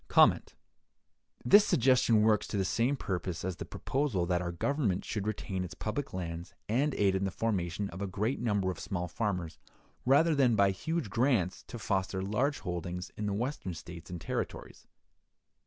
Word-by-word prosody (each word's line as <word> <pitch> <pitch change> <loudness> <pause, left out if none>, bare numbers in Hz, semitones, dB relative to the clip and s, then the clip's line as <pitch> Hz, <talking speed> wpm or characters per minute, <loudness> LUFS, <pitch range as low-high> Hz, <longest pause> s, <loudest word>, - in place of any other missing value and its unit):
This 205 +1 +8
suggestion 125 - +4
works 110 -1 +3
to - - -3
the 95 - +1
same 120 +8 +1
purpose 90 -5 -3
as 95 -2 -3
the - - -5
proposal 130 -10 -1
that 90 0 +1
our 85 -1 -2
Government 100 - 0
should 105 -1 -3
retain 95 -3 -2
its 90 - -7
public 120 +6 -3
lands 85 -2 -5
and 135 +7 +1
aid 100 -2 +3
in 95 0 0
the 95 - +1
formation 100 -2 -1
of 90 +3 -7
a 100 - -1
great 105 +7 -1
number 100 -5 +1
of 90 - -8
small 90 -2 -3
farmers, 90 -4 -3 0.4
rather 150 +6 +4
than, 130 -5 +4
by 100 -1 +4
huge 160 - -3
grants, 115 -6 +1
to - - -7
foster 95 -3 -1
large 125 +9 0
holdings 90 -1 -4
in 105 - -3
the 100 - 0
Western 115 - -3
States 85 0 -10
and 90 -1 -5
Territories. 80 - -5
100 Hz, 170 wpm, -31 LUFS, 90-120 Hz, 0.4 s, This